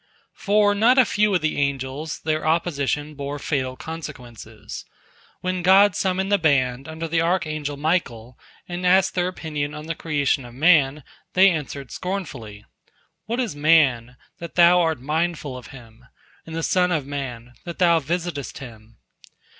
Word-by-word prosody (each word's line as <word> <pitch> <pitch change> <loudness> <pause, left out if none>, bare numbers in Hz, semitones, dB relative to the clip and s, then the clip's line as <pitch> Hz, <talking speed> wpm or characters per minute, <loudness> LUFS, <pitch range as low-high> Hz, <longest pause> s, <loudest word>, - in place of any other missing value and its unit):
" - - -45
For 205 0 +4
not 230 +6 +4
a 260 - +7
few 210 -1 +1
of 180 - +1
the 155 -1 -1
angels 140 +2 -3
their 155 0 -1
opposition 155 -2 -1
bore 140 0 -5
fatal 130 -3 -2
consequences. 125 -9 -9 0.6
When 185 0 -2
God 190 +1 +5
summoned 190 +1 -1
the 205 - +4
band 135 -5 +1
under 160 +1 -5
the 165 0 +1
archangel 155 -4 -1
Michael, 130 -7 -2 0.3
and 175 +1 -5
asked 190 +1 +4
their 180 -1 0
opinion 150 -5 -4
on 150 0 -8
the 165 - -3
creation 145 -4 -1
of 120 -1 -12
man, 150 -2 +3 0.3
they 190 +1 +6
answered 145 -4 -5
scornfully: 140 - -6 0.6
"What 235 +3 -2
is 235 - -2
man, 140 -6 +3 0.2
that 170 -1 -8
Thou 175 +1 +6
art 160 -4 0
mindful 150 0 -2
of 125 - -10
him? 120 -2 -15 0.4
And 160 - -7
the 165 - -3
son 180 +1 +2
of 155 -5 0
man, 125 -4 -6
that 170 -1 -7
Thou 170 -2 +4
visitest 165 -1 -4
him?" 115 -3 -12
155 Hz, 160 wpm, -23 LUFS, 135-175 Hz, 0.6 s, a